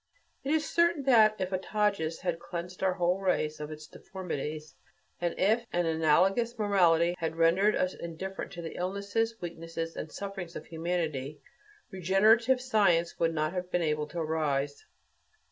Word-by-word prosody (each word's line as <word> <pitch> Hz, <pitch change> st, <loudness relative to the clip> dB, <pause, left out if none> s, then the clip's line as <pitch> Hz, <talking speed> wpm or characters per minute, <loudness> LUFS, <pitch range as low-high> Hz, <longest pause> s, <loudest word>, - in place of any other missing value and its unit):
It 275 Hz, -, -2 dB
is 315 Hz, 0 st, +1 dB
certain 340 Hz, -3 st, +2 dB
that 220 Hz, -5 st, +5 dB
if 185 Hz, -1 st, -3 dB
a 185 Hz, -, 0 dB
Tages 200 Hz, -5 st, -1 dB
had 175 Hz, -3 st, -2 dB
cleansed 175 Hz, +1 st, -7 dB
our 190 Hz, -1 st, +2 dB
whole 180 Hz, +1 st, +1 dB
race 155 Hz, -5 st, 0 dB
of 150 Hz, 0 st, -5 dB
its 155 Hz, 0 st, -8 dB
deformities, 155 Hz, -5 st, -6 dB, 0.4 s
and 175 Hz, -1 st, -1 dB
if 225 Hz, +5 st, +2 dB
an 175 Hz, 0 st, +1 dB
analogous 180 Hz, +9 st, +2 dB
morality 175 Hz, -5 st, +3 dB
had 160 Hz, -1 st, -2 dB
rendered 175 Hz, +6 st, +3 dB
us 185 Hz, -, 0 dB
indifferent 185 Hz, +3 st, -6 dB
to 170 Hz, -2 st, -7 dB
the 165 Hz, -, -6 dB
illnesses, 200 Hz, +5 st, -2 dB
weaknesses, 165 Hz, -1 st, -5 dB
and 155 Hz, -, -6 dB
sufferings 195 Hz, -4 st, -6 dB
of -, -, -7 dB
humanity, 160 Hz, -4 st, -3 dB, 0.5 s
regenerative 215 Hz, +7 st, +4 dB
science 200 Hz, -9 st, +2 dB
would 165 Hz, -1 st, +1 dB
not 155 Hz, +2 st, 0 dB
have 180 Hz, -1 st, -4 dB
been 180 Hz, -1 st, 0 dB
able 150 Hz, -1 st, 0 dB
to 170 Hz, -, -9 dB
arise. 150 Hz, -3 st, -1 dB
175 Hz, 160 wpm, -29 LUFS, 165-200 Hz, 0.5 s, that